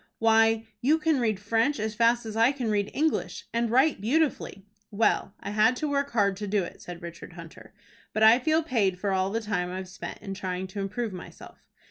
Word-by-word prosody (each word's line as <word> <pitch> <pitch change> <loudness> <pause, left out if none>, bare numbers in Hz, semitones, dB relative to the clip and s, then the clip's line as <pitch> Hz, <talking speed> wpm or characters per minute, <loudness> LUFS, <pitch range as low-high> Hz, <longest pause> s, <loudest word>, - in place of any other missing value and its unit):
"Why, 225 0 +3 0.2
you 295 +6 +3
can 315 -3 +1
read 220 -5 0
French 225 +7 0
as 215 0 -2
fast 235 +1 +2
as 220 -1 -6
I 230 +3 +4
can 245 -6 -2
read 205 -1 0
English, 315 +2 -1
and 235 0 0
write 260 0 +3
beautifully." 255 -5 -1 0.2
"Well, 205 -2 0
I 200 - -5
had 215 +4 +3
to 305 - -2
work 280 -1 0
hard 205 -5 +1
to 205 0 -5
do 200 -1 +1
it," - - -9
said 175 0 -9
Richard 170 +1 -9
Hunter. 165 -2 -12 0.4
"But 215 - 0
I 225 +3 +7
feel 315 +4 +1
paid 205 - 0
for 200 +1 -1
all 190 0 +1
the 225 +3 -2
time 190 -5 -2
I've 185 0 -5
spent 185 +1 -8
in 195 -2 -5
trying 185 -1 -4
to 200 - -7
improve 205 +2 -3
myself. 180 - -12
220 Hz, 210 wpm, -27 LUFS, 195-240 Hz, 0.4 s, I